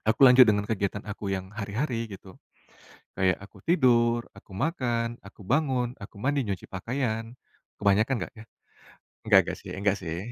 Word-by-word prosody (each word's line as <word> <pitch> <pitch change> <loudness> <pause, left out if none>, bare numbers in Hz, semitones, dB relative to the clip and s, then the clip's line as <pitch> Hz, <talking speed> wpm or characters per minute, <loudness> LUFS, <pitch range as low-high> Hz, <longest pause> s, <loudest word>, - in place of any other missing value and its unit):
Aku 110 +3 +1
lanjut 125 +1 +9
dengan 105 -2 +1
kegiatan 100 -1 -1
aku 100 -1 -4
yang 95 0 -3
hari-hari, 115 +4 -3
gitu. 95 -1 -11 0.8
Kayak 95 -1 +1
aku - - -19
tidur, 120 -7 +3
aku - - -17
makan, 120 - -1
aku 95 0 -14
bangun, 130 -2 +1
aku 100 0 -11
mandi, 140 +3 0
nyuci 100 -5 -4
pakaian, 115 +2 -3 0.5
kebanyakan 105 +5 +3
nggak, - - -18
ya? 110 - -12 0.8
Enggak - - +7
enggak - - -4
sih, - - -10
enggak 100 +1 +1
sih. 85 -1 -5
110 Hz, 155 wpm, -27 LUFS, 100-125 Hz, 0.8 s, lanjut